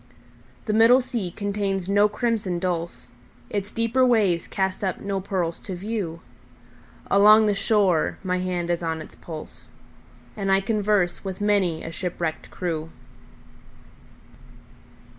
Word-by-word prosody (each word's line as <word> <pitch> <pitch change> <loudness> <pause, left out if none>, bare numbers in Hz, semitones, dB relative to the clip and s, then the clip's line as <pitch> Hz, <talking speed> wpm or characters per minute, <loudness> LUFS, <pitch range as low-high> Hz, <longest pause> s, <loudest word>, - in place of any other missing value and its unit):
The 215 - -1
middle 230 +4 +6
sea 245 -7 -3
contains 200 -1 -2
no 205 +1 +4
crimson 210 -5 -1
dulse, 175 -1 -3 0.5
Its 205 0 -3
deeper 230 +3 +1
waves 210 -9 +2
cast 190 0 -2
up 185 -2 -1
no 200 -1 -2
pearls 180 -4 -2
to 190 - -6
view; 185 -4 -4 0.9
Along 210 +2 +7
the 210 - +2
shore 195 -5 +2
my 180 -1 0
hand 180 -1 -2
is 170 - -1
on 165 -1 -2
its 155 - -10
pulse, 155 -2 -10 0.7
And 195 -3 -1
I 195 - +5
converse 205 -3 0
with 190 -2 -5
many 200 -6 +1
a 165 - -6
shipwrecked 170 -2 -4
crew. 165 -3 -4
195 Hz, 130 wpm, -24 LUFS, 175-210 Hz, 0.9 s, Along